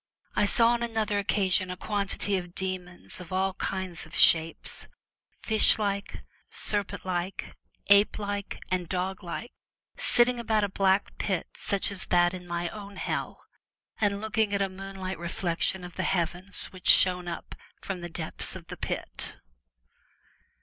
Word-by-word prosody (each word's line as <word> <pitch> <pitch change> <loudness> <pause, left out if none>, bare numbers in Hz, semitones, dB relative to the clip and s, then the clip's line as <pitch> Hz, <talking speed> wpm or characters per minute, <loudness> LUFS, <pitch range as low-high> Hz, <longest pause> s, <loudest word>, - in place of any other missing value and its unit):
I 205 - +3
saw 230 +1 +4
on 240 0 +1
another 220 -3 0
occasion 195 -2 +1
a 180 - -4
quantity 205 -1 -1
of 180 -2 -4
demons 185 -2 -4
of 180 - -11
all 190 +1 +1
kinds 185 -4 -4
of 160 - -10
shapes 165 0 +4 0.3
— - - -43
fish 220 0 +6
like, 200 -2 -2 0.3
serpent 205 -3 -2
like, 180 +1 -3 0.3
ape 200 +1 +5
like, 205 -1 -3
and 180 -2 -1
dog 185 +1 -2
like 180 +7 -5 0.3
— - - -66
sitting 240 0 +3
about 220 -2 +1
a 205 - +1
black 195 +1 +2
pit 185 -5 -1
such 200 0 -1
as 195 -2 -4
that 175 0 +4
in 180 -1 -8
my 170 0 -2
own 205 -1 -9
Hell, - - -4 0.5
and 200 -2 +2
looking 220 -1 +1
at 200 - 0
a 195 - -1
moon 195 +1 -8
like 185 -2 -4
reflection 175 +1 -1
of 180 -1 -8
the - - 0
Heavens 180 +2 +1
which 185 - -7
shone 180 -1 +6
up 170 - -6 0.3
from 190 -3 -5
the 175 - -5
depths 160 -1 -4
of - - -9
the - - -7
pit. - - -4
190 Hz, 165 wpm, -28 LUFS, 180-205 Hz, 0.5 s, fish